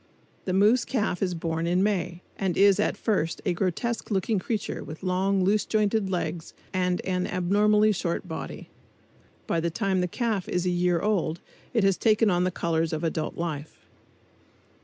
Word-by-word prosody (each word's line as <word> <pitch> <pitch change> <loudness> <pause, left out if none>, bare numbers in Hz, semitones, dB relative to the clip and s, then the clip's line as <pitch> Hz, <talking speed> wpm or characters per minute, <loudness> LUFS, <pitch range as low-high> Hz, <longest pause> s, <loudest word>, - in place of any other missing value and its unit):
The 185 - -1
moose 215 +6 +4
calf 215 -8 -1
is 180 -3 0
born 165 0 -2
in 180 +2 +2
May 180 -4 -1
and 190 -3 -1
is 200 -1 +5
at - - +1
first 185 -8 0
a 185 - +2
grotesque 195 +6 -2
looking 200 +1 +1
creature 215 +3 -3
with 155 +3 -9
long, 190 +1 +1
loose 205 +3 +3
jointed 215 -2 +1
legs 175 -2 -3 0.2
and 180 -1 0
an 180 -1 -1
abnormally 210 +4 +3
short 175 -3 -2
body. 160 - -7 0.8
By 165 - 0
the 170 +1 0
time 190 +1 0
the 180 - 0
calf 215 0 -2
is 180 0 0
a 180 - +2
year 175 -1 +1
old 185 -6 0 0.4
it 225 - +3
has 195 -1 +3
taken 220 -1 +3
on 175 0 +2
the - - +2
colors 165 -2 -1
of 155 - -2
adult 160 -1 -2
life. 160 -3 -5
185 Hz, 175 wpm, -26 LUFS, 170-205 Hz, 0.8 s, is